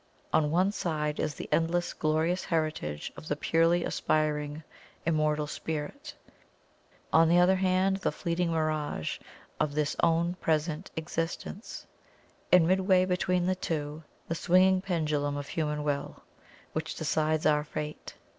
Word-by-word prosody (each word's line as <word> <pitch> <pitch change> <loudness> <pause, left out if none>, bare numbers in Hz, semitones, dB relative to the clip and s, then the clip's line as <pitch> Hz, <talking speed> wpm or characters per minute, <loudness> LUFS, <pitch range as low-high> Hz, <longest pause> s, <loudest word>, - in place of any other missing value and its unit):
On 155 -1 +3
one 180 +5 +2
side 150 -6 -2
is 150 - -1
the - - -7
endless, 175 +1 +1
glorious 160 +4 0
heritage 155 - -2
of 155 - -10
the 145 - 0
purely 165 +3 +2
aspiring, 150 0 -1 0.4
Immortal 155 -2 +1
Spirit; 160 - -5 1.0
on 160 0 +6
the 170 - +5
other 180 +2 +5 0.5
the - - +1
fleeting 170 0 -1
Mirage 155 - -1 0.4
of 145 -1 0
this 150 -1 0
our 170 +1 +2
present 155 +2 0
Existence; 165 +5 -4 0.7
and, 180 -2 +7
midway 185 0 +4
between 180 -1 +1
the 185 - +2
two, 155 -3 -3 0.3
the - - -1
swinging 185 +2 +4
pendulum 150 -6 -1
of 145 -1 -6
HUMAN 150 -2 -1
WILL, 145 -1 -3 0.5
which 160 0 -3
decides 155 0 0
our 150 -1 +4
fate. 150 0 -6
160 Hz, 130 wpm, -29 LUFS, 150-175 Hz, 1.0 s, and